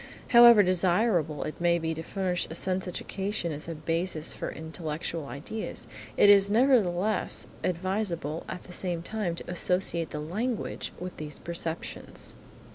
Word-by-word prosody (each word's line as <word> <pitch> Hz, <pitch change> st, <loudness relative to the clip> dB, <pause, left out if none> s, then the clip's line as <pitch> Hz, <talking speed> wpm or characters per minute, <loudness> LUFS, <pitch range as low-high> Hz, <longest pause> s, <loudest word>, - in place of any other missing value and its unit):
However 235 Hz, -3 st, +9 dB
desirable 180 Hz, -4 st, +2 dB
it 155 Hz, -, -6 dB
may 170 Hz, 0 st, +4 dB
be 160 Hz, -1 st, -2 dB
to 160 Hz, -, -5 dB
furnish 180 Hz, +1 st, -1 dB
a 160 Hz, -, -5 dB
sense 185 Hz, +1 st, -1 dB
education 190 Hz, 0 st, -3 dB
as 150 Hz, +1 st, -6 dB
a 165 Hz, -, -4 dB
basis 165 Hz, +1 st, -1 dB
for -, -, -4 dB
intellectual 160 Hz, -1 st, -5 dB
ideas, 165 Hz, +12 st, -5 dB, 0.3 s
it -, -, +7 dB
is 200 Hz, -1 st, +7 dB
nevertheless 215 Hz, -5 st, +2 dB, 0.2 s
advisable 180 Hz, -3 st, -2 dB
at 180 Hz, -, -6 dB
the 180 Hz, -, -11 dB
same 175 Hz, -2 st, -2 dB
time 200 Hz, -3 st, -2 dB
to -, -, -8 dB
associate 180 Hz, -2 st, +1 dB
the 150 Hz, -, -5 dB
language 210 Hz, +10 st, -3 dB
with 180 Hz, 0 st, -6 dB
these 150 Hz, -1 st, -6 dB
perceptions. 170 Hz, -1 st, -4 dB
175 Hz, 145 wpm, -28 LUFS, 165-195 Hz, 0.3 s, However